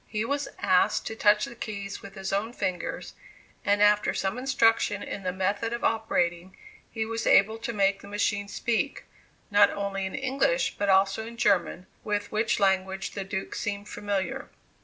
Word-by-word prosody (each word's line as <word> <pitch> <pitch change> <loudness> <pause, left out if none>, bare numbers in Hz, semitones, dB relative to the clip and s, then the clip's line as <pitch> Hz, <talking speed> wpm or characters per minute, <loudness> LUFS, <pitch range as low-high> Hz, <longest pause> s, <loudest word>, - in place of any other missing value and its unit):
He 215 0 -2
was 285 +3 -1
asked 185 -2 +2
to 220 - -4
touch 210 -1 +4
the - - -9
keys 200 -4 -6
with 195 0 -11
his 195 -1 -4
own 215 +4 -1
fingers, 180 -7 -3 0.5
and 205 0 +3
after 210 0 +3
some 195 +6 -1
instruction 225 -5 +2
in 200 - -5
the 185 -1 -2
method 200 +5 -1
of 235 - -4
operating, 180 -5 0 0.3
he 220 -1 -3
was 230 +1 -3
able 220 +3 +5
to 230 - -3
make 200 -2 +1
the - - -12
machine 205 0 -1
speak, 235 +6 -1 0.5
not 205 0 +6
only 195 -1 -3
in 190 - -6
English 275 - +1
but 205 -1 0
also 195 +3 +3
in 235 0 -10
German, 190 -4 +1 0.2
with 205 -1 -2
which 215 +1 +1
language 190 -1 +1
the 200 - -4
Duke 190 0 -4
seemed 205 -1 -4
familiar. 200 -2 -3
205 Hz, 175 wpm, -27 LUFS, 195-225 Hz, 0.5 s, not